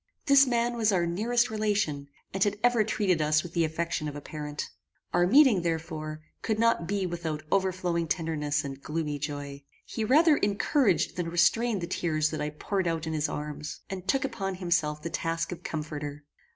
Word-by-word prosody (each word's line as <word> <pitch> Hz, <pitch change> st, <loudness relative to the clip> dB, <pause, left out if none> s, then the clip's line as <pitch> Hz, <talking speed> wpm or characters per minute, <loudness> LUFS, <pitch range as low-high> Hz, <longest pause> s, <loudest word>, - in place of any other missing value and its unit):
This 280 Hz, -2 st, +6 dB
man 240 Hz, -1 st, +1 dB
was 220 Hz, -2 st, +3 dB
our 180 Hz, -3 st, +2 dB
nearest 230 Hz, +7 st, +1 dB
relation, 205 Hz, -10 st, 0 dB, 0.3 s
and 195 Hz, 0 st, +2 dB
had 205 Hz, 0 st, 0 dB
ever 245 Hz, -3 st, +4 dB
treated 195 Hz, -6 st, +1 dB
us 155 Hz, 0 st, +3 dB
with 175 Hz, -, -9 dB
the 170 Hz, -, +2 dB
affection 160 Hz, -1 st, -2 dB
of 145 Hz, -, -5 dB
a -, -, -4 dB
parent. 150 Hz, 0 st, -6 dB, 0.4 s
Our 175 Hz, 0 st, +4 dB
meeting, 260 Hz, -4 st, +6 dB
therefore, 160 Hz, -2 st, -3 dB, 0.2 s
could 220 Hz, -1 st, -1 dB
not 230 Hz, -7 st, +2 dB
be 200 Hz, 0 st, 0 dB
without 165 Hz, -3 st, -3 dB
overflowing 185 Hz, -3 st, +1 dB
tenderness 150 Hz, -3 st, -1 dB
and 135 Hz, 0 st, -6 dB
gloomy 150 Hz, -1 st, -3 dB
joy. 145 Hz, -1 st, -5 dB, 0.2 s
He 225 Hz, -, -4 dB
rather 300 Hz, +6 st, +5 dB
encouraged 205 Hz, -, +1 dB
than 175 Hz, -2 st, -2 dB
restrained 195 Hz, +5 st, +2 dB
the -, -, -2 dB
tears 155 Hz, -3 st, 0 dB
that 155 Hz, -, -3 dB
I 150 Hz, -, -1 dB
poured 185 Hz, +5 st, -2 dB
out 165 Hz, -1 st, -1 dB
in 160 Hz, -, -3 dB
his 155 Hz, -1 st, 0 dB
arms, 150 Hz, +1 st, -5 dB
and 190 Hz, -1 st, -6 dB
took 270 Hz, +6 st, +2 dB
upon 195 Hz, -7 st, -3 dB
himself 165 Hz, -4 st, 0 dB
the 170 Hz, -, -4 dB
task 165 Hz, 0 st, -2 dB
of 180 Hz, -, -6 dB
comforter. 150 Hz, -2 st, -5 dB
170 Hz, 185 wpm, -28 LUFS, 155-205 Hz, 0.4 s, This